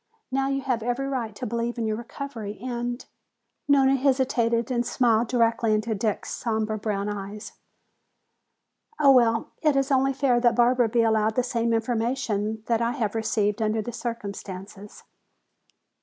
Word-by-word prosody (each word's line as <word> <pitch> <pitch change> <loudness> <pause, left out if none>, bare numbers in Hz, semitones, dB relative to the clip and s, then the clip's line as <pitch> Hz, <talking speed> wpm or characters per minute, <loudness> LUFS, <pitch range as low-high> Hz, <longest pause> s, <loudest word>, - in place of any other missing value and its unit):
Now 270 +1 +1
you 275 0 -1
have 250 -3 -1
every 245 +4 -1
right 245 -6 -3
to - - -5
believe 235 +2 -2
in 230 - -1
your 215 -1 0
recovery 230 -3 -7
and" 240 0 -4 0.6
Nona 275 -1 +5
hesitated 255 -3 +1
and 240 -1 +1
smiled 235 -2 +2
directly 230 -2 +2
into 215 +1 -1
Dick's 215 0 -2
somber 220 -2 -1
brown 205 -1 -2
eyes 205 0 -6 1.5
"oh, 280 -2 +7
well, 230 -3 +3
it 305 -3 +3
is 275 +1 +1
only 270 0 +3
fair 260 -3 +2
that 240 -1 +3
Barbara 245 0 +3
be 235 +1 +2
allowed 220 -1 +2
the 250 - +2
same 235 -1 -1
information 225 -2 -1
that 230 -1 +1
I 235 +1 +1
have 220 -7 -2
received 220 -1 0
under 215 0 0
the 240 - -6
circumstances!" 205 -3 -7
230 Hz, 155 wpm, -25 LUFS, 215-255 Hz, 1.5 s, oh